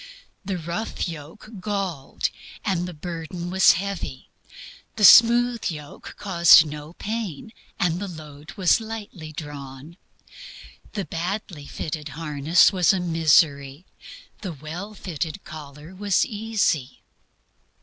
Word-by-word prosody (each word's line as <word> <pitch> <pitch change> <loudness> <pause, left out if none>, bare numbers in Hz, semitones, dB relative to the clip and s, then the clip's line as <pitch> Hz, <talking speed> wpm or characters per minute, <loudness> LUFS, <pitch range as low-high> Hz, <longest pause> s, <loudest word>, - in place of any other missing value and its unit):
The 190 -1 -3
rough 170 +7 -3
yoke 165 +4 -9
galled, 185 -8 -3 0.3
and 180 -4 0
the 180 - -7
burden 170 +2 -6
was 190 0 +6
heavy; 180 -8 -5 0.7
the 210 - +4
smooth 235 +3 +7
yoke 150 -3 -9
caused 170 -5 +6
no 150 +1 -8
pain, 220 -2 -5 0.3
and 175 -2 +1
the 200 - -4
load 155 -3 -10
was 190 +2 +3
lightly 210 -8 -7
drawn. 145 +1 -9 1.0
The 200 -3 -3
badly 170 -3 -4
fitted 150 -1 -5
harness 160 +3 +3
was 185 +1 +4
a 190 - 0
misery; 160 -3 +2 0.6
the 190 -5 -5
well 165 +9 -8
fitted 170 0 -5
collar 150 +2 -10
was 200 0 +1
"easy." 205 - -1
170 Hz, 115 wpm, -24 LUFS, 150-200 Hz, 1.0 s, smooth